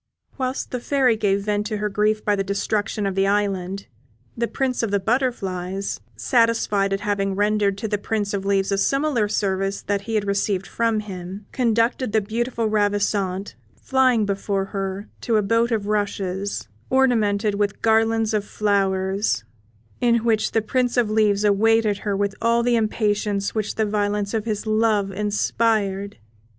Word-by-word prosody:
Whilst 260 Hz, -1 st, -3 dB
the 250 Hz, -, -2 dB
Fairy 255 Hz, -2 st, +2 dB
gave 200 Hz, -2 st, +1 dB
vent 210 Hz, 0 st, -1 dB
to 215 Hz, -1 st, -3 dB
her 210 Hz, +1 st, -1 dB
grief 210 Hz, +1 st, 0 dB
by 205 Hz, -, +3 dB
the 195 Hz, -, -1 dB
destruction 200 Hz, +1 st, -1 dB
of 195 Hz, -, -1 dB
the 195 Hz, +1 st, +2 dB
island, 195 Hz, -1 st, -1 dB, 0.5 s
the 235 Hz, 0 st, -1 dB
Prince 260 Hz, 0 st, -1 dB
of 225 Hz, -, -1 dB
the 200 Hz, 0 st, +1 dB
Butterflies, 195 Hz, -5 st, -2 dB, 0.2 s
satisfied 230 Hz, -5 st, +2 dB
at 195 Hz, 0 st, -1 dB
having 195 Hz, -1 st, -1 dB
rendered 205 Hz, -1 st, +1 dB
to 220 Hz, -, -3 dB
the 210 Hz, -1 st, -1 dB
Prince 205 Hz, -1 st, -2 dB
of 200 Hz, -1 st, -2 dB
Leaves 195 Hz, 0 st, +1 dB
a 195 Hz, -, +1 dB
similar 275 Hz, -3 st, +1 dB
service 195 Hz, -1 st, -1 dB
to -, -, -30 dB
that 200 Hz, -1 st, +1 dB
he 225 Hz, +2 st, -4 dB
had 210 Hz, -1 st, +1 dB
received 200 Hz, -1 st, 0 dB
from 230 Hz, -1 st, 0 dB
him, 190 Hz, 0 st, -8 dB
conducted 235 Hz, -1 st, +1 dB
the 220 Hz, -, +4 dB
beautiful 230 Hz, +3 st, -2 dB
Ravissante, 205 Hz, -2 st, 0 dB, 0.3 s
flying 255 Hz, -5 st, +2 dB
before 200 Hz, 0 st, -1 dB
her, 195 Hz, +1 st, -3 dB
to 230 Hz, -2 st, +1 dB
a 210 Hz, -, +2 dB
boat 230 Hz, +3 st, +2 dB
of 215 Hz, -3 st, 0 dB
rushes, 200 Hz, -2 st, -2 dB, 0.2 s
ornamented 220 Hz, -6 st, +2 dB
with 205 Hz, 0 st, -2 dB
garlands 225 Hz, 0 st, +2 dB
of 210 Hz, -1 st, +1 dB
flowers, 195 Hz, -, 0 dB, 0.6 s
in 235 Hz, -2 st, +2 dB
which 220 Hz, -2 st, +2 dB
the 225 Hz, -, +2 dB
Prince 250 Hz, +2 st, 0 dB
of 230 Hz, -3 st, +2 dB
Leaves 210 Hz, -2 st, +2 dB
awaited 210 Hz, 0 st, +3 dB
her 200 Hz, -2 st, -2 dB
with 200 Hz, 0 st, 0 dB
all 235 Hz, +1 st, +2 dB
the 240 Hz, 0 st, +2 dB
impatience 210 Hz, -2 st, 0 dB
which 215 Hz, -1 st, -2 dB
the 220 Hz, -, +1 dB
violence 205 Hz, 0 st, -1 dB
of 220 Hz, -1 st, -1 dB
his 215 Hz, -2 st, -2 dB
love 215 Hz, -2 st, +1 dB
inspired. 205 Hz, 0 st, 0 dB
210 Hz, 165 wpm, -22 LUFS, 200-225 Hz, 0.6 s, the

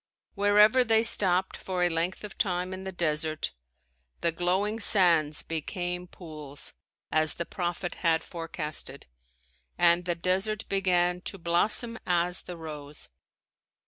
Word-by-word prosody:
Wherever 210 Hz, +4 st, +4 dB
they 225 Hz, -1 st, +3 dB
stopped 190 Hz, -4 st, +4 dB
for 185 Hz, -2 st, -3 dB
a -, -, +4 dB
length 170 Hz, +4 st, -2 dB
of 210 Hz, -, -8 dB
time 185 Hz, -5 st, -1 dB
in 190 Hz, 0 st, -8 dB
the 190 Hz, -, -4 dB
desert, 155 Hz, -, -2 dB, 0.7 s
"the 170 Hz, -, +2 dB
glowing 185 Hz, +6 st, -1 dB
sands 170 Hz, -8 st, +4 dB
became 180 Hz, +2 st, -4 dB
pools," 150 Hz, -6 st, -7 dB, 0.4 s
as 155 Hz, 0 st, +2 dB
the 170 Hz, -, -4 dB
prophet 175 Hz, -1 st, -4 dB
had 165 Hz, -2 st, +2 dB
forecasted, 165 Hz, -3 st, -5 dB, 0.7 s
and 175 Hz, 0 st, +3 dB
the 175 Hz, -1 st, -1 dB
desert 190 Hz, +5 st, -1 dB
began 180 Hz, -2 st, +1 dB
to 195 Hz, -, -3 dB
"blossom 205 Hz, +7 st, +2 dB
as 175 Hz, 0 st, +1 dB
the 180 Hz, -, -9 dB
rose." 150 Hz, -2 st, -8 dB
175 Hz, 130 wpm, -27 LUFS, 165-195 Hz, 0.7 s, Wherever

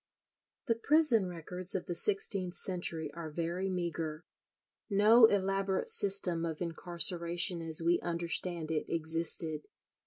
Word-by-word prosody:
The 235 Hz, -, +2 dB
prison 235 Hz, -, +2 dB
records 180 Hz, +1 st, -4 dB
of 185 Hz, -, -2 dB
the 175 Hz, -, -4 dB
sixteenth 195 Hz, -1 st, 0 dB
century 165 Hz, -4 st, -3 dB
are 165 Hz, -1 st, -7 dB
very 170 Hz, +4 st, -3 dB
meagre. 170 Hz, -3 st, -4 dB, 0.6 s
No 220 Hz, +3 st, +6 dB
elaborate 195 Hz, -1 st, 0 dB
system 190 Hz, -4 st, +2 dB
of 160 Hz, -2 st, -4 dB
incarceration 170 Hz, +1 st, -2 dB
as 165 Hz, 0 st, 0 dB
we 170 Hz, +1 st, +3 dB
understand 170 Hz, -1 st, -2 dB
it 155 Hz, -, -1 dB
existed. 160 Hz, -1 st, +1 dB
175 Hz, 120 wpm, -32 LUFS, 165-195 Hz, 0.6 s, No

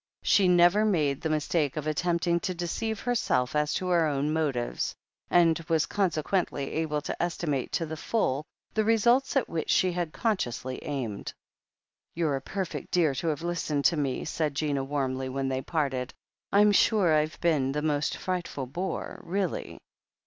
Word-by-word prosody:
She 195 Hz, -2 st, +4 dB
never 175 Hz, +3 st, +5 dB
made 155 Hz, -10 st, +1 dB
the 160 Hz, -, -1 dB
mistake 155 Hz, -1 st, 0 dB
of 150 Hz, -, -3 dB
attempting 170 Hz, +2 st, +1 dB
to 185 Hz, +1 st, -3 dB
deceive 220 Hz, +6 st, -3 dB
herself 155 Hz, -, 0 dB
as 150 Hz, 0 st, +1 dB
to 185 Hz, -, -2 dB
her 170 Hz, -3 st, +3 dB
own 145 Hz, +1 st, 0 dB
motives, 140 Hz, -7 st, -1 dB, 0.3 s
and 170 Hz, -2 st, +4 dB
was 160 Hz, -2 st, +3 dB
consequently 175 Hz, -6 st, -1 dB
able 155 Hz, -2 st, -1 dB
to -, -, -4 dB
estimate 160 Hz, -6 st, -1 dB
to 165 Hz, -, 0 dB
the 160 Hz, 0 st, -5 dB
full 150 Hz, -, 0 dB, 0.3 s
the 220 Hz, -, +2 dB
results 235 Hz, +5 st, +3 dB
at 270 Hz, -, +2 dB
which 165 Hz, -1 st, -3 dB
she 185 Hz, -, +3 dB
had 175 Hz, -2 st, -2 dB
consciously 130 Hz, -, -2 dB
aimed. 125 Hz, -8 st, -4 dB, 0.8 s
"You're 160 Hz, -4 st, +1 dB
a -, -, -7 dB
perfect 190 Hz, +5 st, -4 dB
dear 165 Hz, -5 st, +2 dB
to 165 Hz, -, -3 dB
have 155 Hz, 0 st, -1 dB
listened 160 Hz, -4 st, -1 dB
to 170 Hz, -, +5 dB
me," 140 Hz, -3 st, -1 dB
said 155 Hz, -2 st, -1 dB
Gina 140 Hz, -2 st, 0 dB
warmly 135 Hz, -2 st, -2 dB
when 135 Hz, 0 st, -2 dB
they 130 Hz, 0 st, -1 dB
parted. 135 Hz, -5 st, -2 dB, 0.4 s
"I'm 205 Hz, +1 st, +6 dB
sure 200 Hz, -4 st, +4 dB
I've 155 Hz, +1 st, +1 dB
been 150 Hz, -6 st, +2 dB
the 150 Hz, +2 st, -2 dB
most 150 Hz, -1 st, 0 dB
frightful 175 Hz, -7 st, -3 dB
bore, 175 Hz, +9 st, -4 dB
really." 185 Hz, 0 st, -2 dB
160 Hz, 165 wpm, -28 LUFS, 140-180 Hz, 0.8 s, I'm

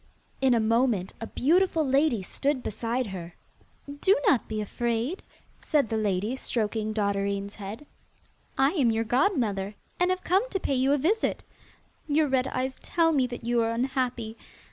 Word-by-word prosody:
In 260 Hz, -2 st, +4 dB
a -, -, +3 dB
moment 225 Hz, -3 st, +1 dB
a 225 Hz, -, -4 dB
beautiful 330 Hz, +4 st, +2 dB
lady 270 Hz, -5 st, +2 dB
stood 275 Hz, +6 st, -1 dB
beside 235 Hz, +4 st, -2 dB
her. 180 Hz, -4 st, -7 dB, 0.5 s
'Do 290 Hz, +8 st, +2 dB
not 255 Hz, -, +3 dB
be 215 Hz, -1 st, -3 dB
afraid,' 235 Hz, -, -2 dB, 0.4 s
said 285 Hz, -7 st, +1 dB
the 225 Hz, -, -1 dB
lady, 210 Hz, +2 st, 0 dB
stroking 220 Hz, -4 st, -2 dB
Dotterine's 200 Hz, -1 st, -1 dB
head. 210 Hz, +7 st, -8 dB, 0.7 s
'I 270 Hz, +2 st, +4 dB
am 280 Hz, -10 st, +2 dB
your 225 Hz, 0 st, +1 dB
godmother, 225 Hz, -, 0 dB, 0.2 s
and 360 Hz, +1 st, +3 dB
have 370 Hz, 0 st, -1 dB
come 390 Hz, +8 st, +2 dB
to 390 Hz, -, -2 dB
pay 280 Hz, -, -1 dB
you 265 Hz, +1 st, +2 dB
a 290 Hz, -, +4 dB
visit. 385 Hz, +11 st, 0 dB, 0.6 s
Your 300 Hz, +1 st, +3 dB
red 265 Hz, -1 st, +1 dB
eyes 260 Hz, +1 st, -2 dB
tell 330 Hz, -1 st, +2 dB
me 270 Hz, -5 st, +2 dB
that 245 Hz, -1 st, -7 dB
you 240 Hz, 0 st, +2 dB
are 225 Hz, -, +1 dB
unhappy. 240 Hz, -2 st, -2 dB
245 Hz, 165 wpm, -27 LUFS, 220-285 Hz, 0.7 s, In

